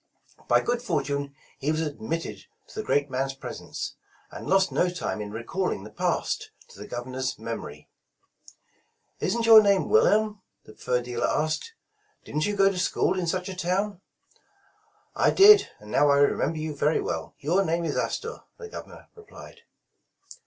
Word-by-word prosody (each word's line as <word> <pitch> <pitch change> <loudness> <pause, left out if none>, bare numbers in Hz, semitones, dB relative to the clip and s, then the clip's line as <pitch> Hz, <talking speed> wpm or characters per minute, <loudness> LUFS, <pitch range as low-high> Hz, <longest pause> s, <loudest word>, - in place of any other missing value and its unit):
By - - +4
good 240 0 -1
fortune 140 - -2 0.2
he 145 +3 0
was 155 - -1
admitted 160 +1 -4 0.2
to - - -14
the - - -2
great 145 - 0
man's 135 +1 -2
presence, 130 -2 -7 0.3
and - - -8
lost 190 0 +3
no 180 - +2
time 175 -10 -4
in 105 - -5
recalling 115 - -3
the 110 - -10
past - - -1 0.2
to - - -15
the - - -8
Governor's 130 +2 -4
memory. 110 -10 -7 1.3
Isn't 230 +5 0
your 225 -1 +10
name 200 -2 +2
Wilhelm 215 - +3
?" - - -48
the 110 - -14
fur 125 +2 -1
dealer 120 -1 -2
asked. 155 - -1
' 425 -1 -45
' 425 - -41
Didn 150 - -3
't 155 - +1
you 205 - -1
go 195 -1 +4
to 185 - -4
school 185 0 +1
in 175 - -2
such 180 +1 -1
a 190 - -5
town? 185 +2 -1 0.3
' - - -37
' 425 -1 -39
''I - - +3
did, 405 +1 +8
and 105 0 -12
now 145 - +4
I 140 - +5
remember 145 +2 +2
you 155 -1 -4
very 150 +2 +1
well. 80 -1 -4
Your 175 +8 +1
name 170 -1 -1
is 155 - -2
Astor," - - -3 0.2
the 450 - -9
Governor - - -11
replied. 440 +1 -14
165 Hz, 180 wpm, -26 LUFS, 135-200 Hz, 1.3 s, your